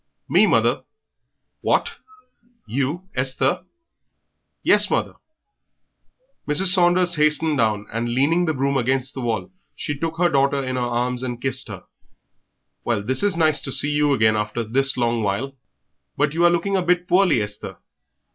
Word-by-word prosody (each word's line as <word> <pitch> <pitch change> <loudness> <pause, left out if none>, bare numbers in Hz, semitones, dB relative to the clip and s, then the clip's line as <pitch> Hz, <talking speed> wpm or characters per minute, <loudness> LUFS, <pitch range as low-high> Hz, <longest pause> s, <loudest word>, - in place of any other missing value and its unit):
"Me, - - +4
mother." - - +1 0.8
"What! - - 0 0.7
You, 140 +9 -3
Esther?" 135 +5 0 1.0
"Yes, - - +4
mother." - - -1 1.3
Mrs. 180 +5 +4
Saunders 175 -1 +3
hastened 150 0 +2
down, 105 -2 0
and, 115 +1 -2
leaning 145 +9 +1
the 160 - -1
broom 135 +1 0
against 130 +1 0
the 135 - -6
wall, 120 - -3 0.2
she 145 - -4
took 165 +3 -4
her 175 +1 +3
daughter 140 -2 +1
in 130 0 -4
her 125 - -2
arms 120 +1 -2
and 120 -2 -5
kissed 130 +1 -1
her. 100 -4 -9 1.0
"Well, 115 -4 -1
this 130 +5 0
is 205 -4 +1
nice 155 -2 +2
to 135 - -5
see 145 +3 +2
you 150 0 +1
again, 110 -5 +2
after 105 +2 -3
this 135 +5 0
long 120 -1 0
while. 110 +7 -3 0.6
But 145 +1 0
you 170 +2 +2
are - - +6
looking 175 +3 -1
a 190 - +1
bit 180 0 0
poorly, 180 -6 +3
Esther." 105 -1 -6
135 Hz, 155 wpm, -21 LUFS, 120-165 Hz, 1.3 s, are